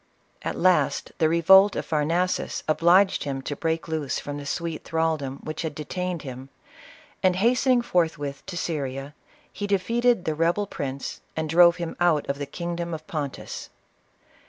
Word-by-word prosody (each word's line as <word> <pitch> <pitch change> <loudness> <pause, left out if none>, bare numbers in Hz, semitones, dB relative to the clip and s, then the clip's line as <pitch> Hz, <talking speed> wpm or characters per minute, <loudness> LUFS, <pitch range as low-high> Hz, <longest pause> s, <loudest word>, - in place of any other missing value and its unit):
At - - -3
last, 185 0 +2
the 160 -2 +4
revolt 190 +5 +6
of - - -3
Pharnaces 165 +4 0
obliged 175 +5 +4
him 135 -2 -4
to 145 - -4
break 160 +2 -2
loose 155 -4 -2
from 145 0 -5
the 145 -1 -7
sweet 165 +1 -3
thraldom 160 -4 -1
which 155 0 -5
had 160 -3 -4
detained 180 +3 -4
him, 130 -1 -8 0.7
and 185 -1 +3
hastening 245 +4 +3
forthwith 145 -8 -1
to 185 -2 -5
Syria, 140 -4 -3 0.4
he 205 - -4
defeated 230 +2 +2
the 155 - 0
rebel 170 +6 +1
prince, 140 -7 -5
and 160 0 -2
drove 170 +2 +6
him 170 -2 -5
out 170 -4 +2
of 140 +1 -2
the 145 - -4
kingdom 170 +2 -4
of 155 0 -10
Pontus. 145 -4 -5
165 Hz, 155 wpm, -25 LUFS, 145-180 Hz, 0.7 s, revolt